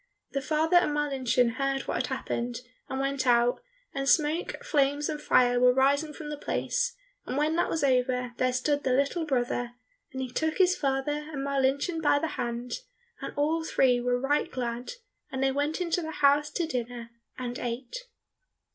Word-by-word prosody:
The 275 - -1
father 315 +5 +2
and 350 -4 +3
Marlinchen 255 -4 +1
heard 275 0 0
what - - -2
had - - -1
happened 240 +1 -3 0.3
and 265 - -3
went 275 -1 -1
out, 240 - +3 0.3
and 275 0 -1
smoke, 310 +2 +2
flames, 290 - +1
and 300 -1 -4
fire 245 -4 +4
were 250 0 +5
rising 280 +3 +3
from 300 0 -7
the 295 - -4
place, 485 +8 -1 0.3
and 260 - -2
when 305 +2 +1
that - - +1
was 320 -3 -1
over, 250 -2 +1
there 255 0 +2
stood 285 +3 0
the 255 - +1
little 280 +5 +1
brother, 245 -2 -1 0.4
and 265 - -6
he 255 - -6
took 315 +4 -1
his 370 -1 +4
father 290 +2 -1
and 275 -3 -4
Marlinchen 280 +4 0
by 290 -2 +4
the 320 +2 -1
hand, 240 - -4 0.4
and - - -4
all 315 +3 +1
three 250 -5 +3
were 245 0 +1
right 285 +3 +1
glad, 245 - -4 0.4
and 265 0 -2
they 270 - +3
went 290 +4 -1
into 355 0 0
the 320 - -5
house 295 -1 +3
to 345 - -1
dinner, 245 -5 -4 0.3
and 245 -1 -4
ate. 250 - -5
275 Hz, 180 wpm, -28 LUFS, 250-300 Hz, 0.4 s, were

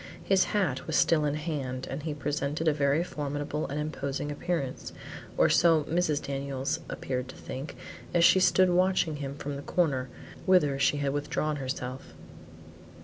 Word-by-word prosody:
His 195 -1 +3
hat 170 -11 -1
was 160 - -1
still 155 -3 +4
in 145 0 0
his 150 - -5
hand, 130 -5 -3
and 135 +3 -4
he 150 0 -3
presented 150 +2 -2
a 155 - +5
very 145 +2 +2
formidable 145 -1 -3
and 145 +2 -3
imposing 145 -1 -3
appearance, 145 -3 -3 0.4
or - - +5
so 165 -3 +4
Mrs. 155 -2 +1
Daniels 135 -1 -2
appeared 125 -1 -3
to 130 - -10
think 135 +4 -7 0.4
as 175 -1 +3
she 190 - +6
stood 185 0 +4
watching 180 -3 +2
him 140 -1 -5
from 145 -1 -4
the - - -6
corner, 140 -7 0 0.4
whither 150 -7 +4
she 145 - +3
had 140 -1 0
withdrawn 150 +1 -1
herself. 130 -1 -5
145 Hz, 165 wpm, -29 LUFS, 140-160 Hz, 0.4 s, she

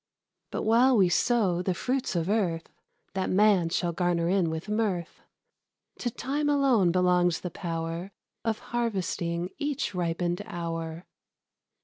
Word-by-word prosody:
But - - -3
while 240 +3 +5
we 190 -3 +5
sow 195 -4 +2
the 185 0 -1
fruits 255 0 -1
of 165 -1 0
earth, 185 -6 0 0.4
That 190 -1 -1
man 195 -3 +4
shall 175 0 0
garner 175 -1 +1
in 185 -3 +2
with 160 +4 -4
mirth, 210 -5 -1 0.8
To 245 - -1
Time 285 +5 -2
alone 265 -11 +4
belongs 180 -1 +2
the 180 - -4
power 165 +1 -4 0.3
Of 225 -1 0 0.2
harvesting 180 -6 -1
each 290 -7 -2
ripened 175 +1 -1
hour. 165 -2 -5
180 Hz, 130 wpm, -28 LUFS, 170-220 Hz, 0.8 s, while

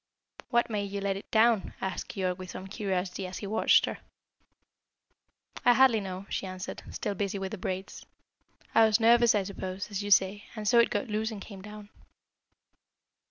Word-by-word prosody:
"What 240 -1 +2
made 205 -3 -2
you 200 - -3
let 195 -1 -1
it 195 - -9
down?" 220 -2 +3
asked 190 -2 -4
Keyork 185 -2 -2
with 185 -1 -8
some 185 - -7
curiosity, 190 -2 -3
as 185 - -7
he - - -6
watched 210 +2 +4
her. - - -5 1.6
"I 245 0 +6
hardly 260 -4 +5
know," 190 -1 -6
she 190 - -3
answered, 185 +1 -6
still 205 - -3
busy 200 0 -2
with 190 -1 -4
the 215 - -6
braids. 190 +1 -5 0.7
"I 225 - +6
was 215 +1 +3
nervous, 235 0 +5
I 205 - +2
suppose, 190 +1 -6
as 200 0 -2
you 205 - -4
say, 200 +1 +3
and 215 -1 -4
so 235 +3 +5
it 235 - +5
got - - -1
loose 215 0 -1
and 220 -3 -6
came 195 -1 -10
down." 210 0 -10
200 Hz, 185 wpm, -29 LUFS, 190-220 Hz, 1.6 s, I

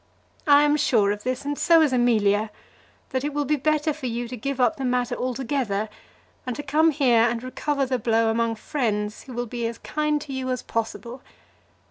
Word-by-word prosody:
I 290 0 +7
am 295 0 +3
sure 215 -8 +3
of 205 0 -4
this, 255 +4 -3
and 290 0 -1
so 330 +1 +5
is 290 -4 +1
Amelia, 220 -4 +2 0.6
that 260 0 -1
it 290 0 -3
will 295 -1 0
be 300 +3 +2
better 305 +2 +1
for 285 -3 -5
you 240 0 -3
to 250 - -5
give 275 +3 -3
the 250 +1 +1
matter 250 -1 0
up - - -4
altogether, 250 -4 -2 0.5
and 250 -2 -4
to 290 - -5
come 305 +3 +3
here 265 -6 +3
and 235 0 +1
recover 280 +2 -1
the 255 -1 -1
blow 225 0 +2
among 230 0 0
friends 215 -5 -2
who 260 - -9
will 240 +1 -2
be 235 0 -3
as 230 0 -6
kind 300 0 -1
to 290 -2 -7
you 260 -1 -3
as 255 -1 -2
possible. 235 +2 -4
255 Hz, 205 wpm, -24 LUFS, 230-285 Hz, 0.6 s, I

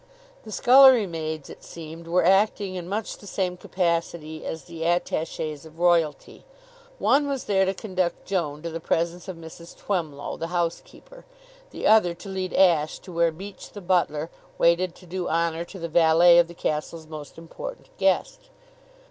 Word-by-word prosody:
The 215 - -9
scullery 255 0 +7
maids, 160 -4 -5
it - - -12
seemed, 165 0 -10
were 175 0 +2
acting 195 +1 +3
in 180 -1 -6
much 210 +2 -3
the 205 - -13
same 185 -2 -2
capacity 170 -3 -2
as 160 - -5
the 165 -2 -7
attaches 160 -3 -1
of 160 0 -15
royalty. 170 -3 +1 0.5
One 285 - +3
was 275 -2 -2
there 195 -2 +2
to 190 +1 -1
conduct 185 -4 -2
Joan 155 -6 -2
to 170 - -4
the 165 - -4
presence 170 +3 -1
of 185 -3 -6
Mrs. 165 +1 -12
Twemlow, 160 -8 -3
the 165 - -4
housekeeper; 175 - -4 0.4
the - - -6
other 210 -6 +5
to 175 +3 -10
lead 190 -1 -3
Ashe 165 -5 +3
to 185 - -13
where 170 0 +2
Beach, 190 +4 -10
the 205 - -7
butler, 170 -4 0 0.3
waited 170 +1 +2
to 185 - -16
do 180 +1 -4
honor 165 0 0
to 190 - -11
the 170 -2 -4
valet 170 +1 +6
of 170 - +4
the 170 - -12
castle's 160 +1 -3
most 155 -2 -10
important - - -9
guest. - - 0
170 Hz, 170 wpm, -25 LUFS, 165-190 Hz, 0.5 s, scullery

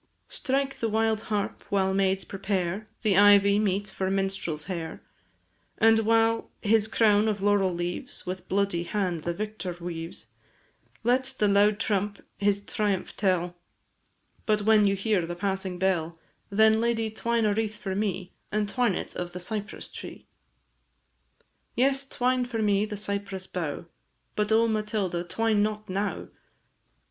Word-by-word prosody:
Strike 270 0 -1
the 225 - 0
wild 220 0 +1
harp 210 -2 -2
while 190 -1 +2
maids 195 0 +1
prepare 195 +1 -2 0.2
The 210 -4 +3
ivy 200 0 +6
meet 205 -1 0
for 190 -1 -3
minstrel's 195 -5 -1
hair; 170 -3 -5 0.7
And, 225 0 +5
while 225 +1 +2
his 220 0 +3
crown 215 -1 +3
of 210 -2 0
laurel 200 -1 +3
leaves, 175 0 -4
With 185 +1 -5
bloody 200 -3 +1
hand 175 -3 -2
the 170 - 0
victor 210 -4 -5
weaves, 170 -1 -6 0.7
Let 260 +3 +1
the 210 - +3
loud 205 +1 +4
trump 205 -3 -1 0.2
his 200 0 +1
triumph 205 -3 -1
tell; 180 -3 0 0.9
But 210 -1 +2
when 215 -1 +5
you 200 0 +3
hear 200 -2 +1
the 175 - -4
passing 190 0 -2
bell, 175 -3 0 0.3
Then, 220 +2 +4
lady, 225 -2 0
twine 230 +1 0
a 210 - +3
wreath 215 0 -2
for 190 -2 -4
me, 190 -2 -2 0.2
And 210 0 0
twine 235 -2 +1
it - - -5
of 175 -1 -4
the 180 - -5
cypress 210 +3 -5
tree! - - -9 1.5
Yes, 270 +2 +2
twine 250 0 +1
for 230 -3 -2
me 205 0 +3
the 210 -1 -6
cypress 200 -2 -3
bough; 170 -3 -4 0.5
But, 210 0 0
O 225 +1 +5
Matilda, 210 -5 -1
twine 220 +3 +1
not 215 0 -1
now! 195 +2 -3
205 Hz, 150 wpm, -27 LUFS, 190-220 Hz, 1.5 s, ivy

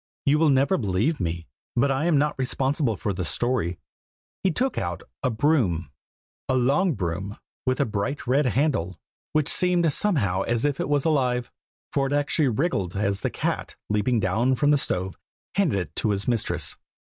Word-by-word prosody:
You 145 +2 +4
will 160 -1 +4
never 140 +7 +3
believe 110 - 0
me, 85 -2 -3 0.3
but 135 +3 +3
I 135 +4 0
am 170 -4 +3
not 150 +1 +2
responsible 130 - 0
for 100 - -2
the 95 0 -3
story. 105 -2 0 0.6
He 190 - +2
took 255 +9 -1
out 85 -1 -4 0.2
a - - +1
broom. 110 - +1 0.6
A 130 - +2
long 140 +9 +2
broom, 95 +2 -3 0.3
with 130 0 +1
a - - +3
bright 110 +7 -3
red 135 +3 +2
handle, 110 - 0 0.3
which 155 -1 +2
seemed 175 -4 +3
somehow 115 - +1
as 120 +5 0
if 145 -2 0
it - - -2
was 145 -2 +1
alive, 125 -6 +1 0.4
for 135 -1 +1
it 140 - -2
actually 145 +1 +2
wriggled 115 - -1
as 100 -1 0
the - - -1
cat, - - -3 0.2
leaping 105 +3 +2
down 110 +7 +1
from 145 +3 +2
the - - +6
stove, 95 -6 -1 0.3
handed 180 - +2
it 85 -5 -6
to 110 - +1
his 100 -1 -1
mistress. 120 -3 -1
125 Hz, 180 wpm, -25 LUFS, 100-145 Hz, 0.6 s, the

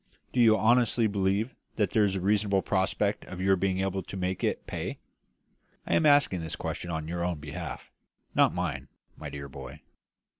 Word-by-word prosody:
Do 125 - 0
you 110 -2 +6
honestly 120 0 +3
believe 100 +3 0 0.2
that 105 -5 +1
there 110 - +4
is 100 -2 +1
a - - -1
reasonable 100 0 +2
prospect 100 +1 0
of 90 - -8
your 95 +1 +4
being 95 0 0
able 95 0 -1
to 95 - -8
make 90 0 -2
it - - -1
pay? - - -4 0.9
I - - -1
am 155 - +4
asking 145 - +4
this 80 -1 -4
question 85 - -4
on 80 -2 -3
your 85 +1 -2
own 90 -2 -1
behalf, 75 -2 -7 0.4
not - - +5
mine, 80 -7 -3 0.3
my - - -7
dear 70 -1 -7
boy. 70 +1 -10
95 Hz, 185 wpm, -28 LUFS, 85-105 Hz, 0.9 s, you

